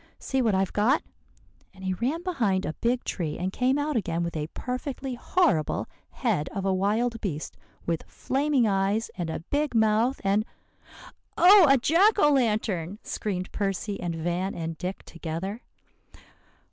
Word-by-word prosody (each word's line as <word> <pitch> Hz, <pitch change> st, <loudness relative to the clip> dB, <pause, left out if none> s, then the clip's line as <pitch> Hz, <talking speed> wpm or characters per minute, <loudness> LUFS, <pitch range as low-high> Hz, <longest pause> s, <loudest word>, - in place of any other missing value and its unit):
See 265 Hz, -1 st, -1 dB
what 220 Hz, -5 st, +2 dB
I've 190 Hz, -1 st, 0 dB
got;' 230 Hz, +8 st, +2 dB, 0.7 s
and 190 Hz, -, -13 dB
he 190 Hz, 0 st, 0 dB
ran 270 Hz, -, -2 dB
behind 225 Hz, -, 0 dB
a -, -, -2 dB
big 240 Hz, +6 st, 0 dB
tree, 160 Hz, -5 st, -3 dB
and 185 Hz, +2 st, -3 dB
came 255 Hz, +2 st, +2 dB
out 290 Hz, 0 st, -1 dB
again 170 Hz, -6 st, -1 dB
with 170 Hz, -1 st, -4 dB
a 150 Hz, -1 st, -2 dB
perfectly 260 Hz, +1 st, -4 dB
horrible 225 Hz, -, +1 dB, 0.2 s
head 150 Hz, +3 st, -1 dB
of 195 Hz, -1 st, -2 dB
a 195 Hz, -, +2 dB
wild 220 Hz, +5 st, 0 dB
beast 155 Hz, -7 st, -4 dB, 0.3 s
with 165 Hz, -1 st, -1 dB
flaming 270 Hz, -3 st, +1 dB
eyes 200 Hz, +3 st, 0 dB
and 175 Hz, -3 st, -3 dB
a 160 Hz, -, -4 dB
big 285 Hz, -, -1 dB
mouth 220 Hz, +4 st, +3 dB
and 200 Hz, +2 st, +2 dB, 0.5 s
" -, -, -18 dB
"Oh, 370 Hz, -1 st, +8 dB
a 275 Hz, -, +7 dB
jack 350 Hz, -, +4 dB
o 295 Hz, -7 st, +5 dB
lantern!" 210 Hz, -, 0 dB
screamed 185 Hz, -4 st, -3 dB
Percy 200 Hz, 0 st, -2 dB
and 175 Hz, -2 st, -3 dB
Van 175 Hz, +4 st, -2 dB
and 165 Hz, -1 st, -4 dB
Dick 185 Hz, +4 st, -5 dB
together. 170 Hz, +7 st, -5 dB
210 Hz, 160 wpm, -26 LUFS, 180-255 Hz, 0.7 s, Oh